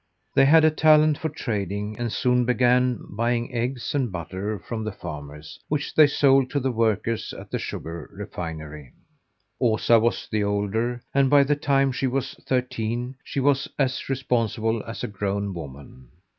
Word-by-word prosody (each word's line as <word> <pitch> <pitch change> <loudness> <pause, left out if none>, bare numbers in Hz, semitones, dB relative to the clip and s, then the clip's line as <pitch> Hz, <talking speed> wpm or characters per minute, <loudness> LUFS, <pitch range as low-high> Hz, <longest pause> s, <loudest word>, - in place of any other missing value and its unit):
They 135 - +5
had 160 +3 +6
a 155 - +5
talent 155 -1 +4
for 160 -1 -2
trading 105 - -3
and 120 -2 -2
soon 125 +1 +2
began 125 0 +2
buying 120 +4 -1
eggs 120 +1 -2
and 130 -6 0
butter 95 +4 -4
from 110 +5 -5
the 110 - -3
farmers, 75 -4 -9
which 145 -1 -2
they 155 -1 +7
sold 135 -2 +3
to 140 - 0
the 130 0 -1
workers 115 0 0
at - - -10
the - - -1
sugar 80 -1 -6
refinery. 75 -5 -7 0.7
Osa 115 0 +4
was 115 +2 0
the 105 -2 +1
older, 105 +4 -1
and, 135 -1 +3
by 145 0 +6
the 145 +1 +1
time 135 -2 +2
she 130 +1 -1
was 135 +1 -2
thirteen, 125 -1 -1
she 140 - -4
was 140 0 +2
as 130 -2 -1
responsible 115 -4 0
as 115 - -6
a - - -1
grown 100 0 -2
woman. 70 -5 -10
120 Hz, 165 wpm, -24 LUFS, 100-135 Hz, 0.7 s, they